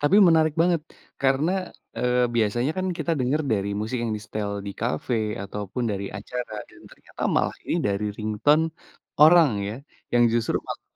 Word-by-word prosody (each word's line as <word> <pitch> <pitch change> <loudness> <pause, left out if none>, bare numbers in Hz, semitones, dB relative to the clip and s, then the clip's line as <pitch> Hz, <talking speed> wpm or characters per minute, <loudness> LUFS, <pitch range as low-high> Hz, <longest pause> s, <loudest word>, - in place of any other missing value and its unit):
tapi 145 +7 +4
menarik 160 -2 +4
banget 175 -2 +2 0.4
karena, 135 +5 +2 0.5
eee, 125 0 +2
biasanya 120 +5 +1
kan 185 - -1
kita 170 - -1
denger 135 +5 +1
dari 100 -2 0
musik 115 +4 -2
yang 115 -2 -1
disetel 105 -1 -4 0.2
di 100 - -4
kafe, 120 +1 -1 0.3
ataupun 105 +4 -5
dari 100 0 -3
acara 120 +2 -6 0.2
dan - - -18
ternyata - - -11
malah - - +1
ini - - +1
dari 100 +1 -1
ringtone 110 +9 +2 0.6
orang 160 -1 +7 0.2
ya, 105 - -4 0.4
yang 120 0 +5
justru 115 -1 +1
malah - - -6
125 Hz, 160 wpm, -25 LUFS, 105-150 Hz, 0.6 s, orang